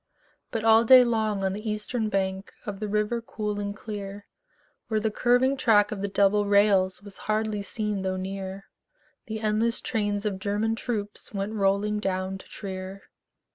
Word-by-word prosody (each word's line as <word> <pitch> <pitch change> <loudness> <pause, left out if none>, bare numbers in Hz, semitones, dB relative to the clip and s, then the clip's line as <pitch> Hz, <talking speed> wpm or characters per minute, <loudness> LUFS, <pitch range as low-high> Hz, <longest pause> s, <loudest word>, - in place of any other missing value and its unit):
But 225 -2 -3
all 225 0 +6
day 255 +2 +9
long 220 -4 0
on 190 0 0
the 215 +2 -4
eastern 215 +1 -2
bank 190 -1 -2
Of 200 -2 -5
the 215 - -3
river 210 +3 0
cool 210 -2 -4
and 205 0 -3
clear, 205 -1 -7 0.6
Where 220 -1 +1
the 220 0 0
curving 245 +4 +3
track 210 -5 +4
of 205 -2 -4
the 200 - -1
double 200 +1 +3
rails 200 -2 +3
Was 205 -2 -10
hardly 215 -1 0
seen 210 -1 -3
though 190 0 -1
near, 190 +1 -5 0.6
The 220 0 -4
endless 220 +2 +1
trains 205 -3 -1
of 195 -3 -1
German 205 +3 0
troops 210 -3 -4
Went 200 +2 -2
rolling 205 +1 +1
down 190 -1 -2
to - - -14
Trier. 190 0 -7
205 Hz, 170 wpm, -26 LUFS, 195-220 Hz, 0.6 s, day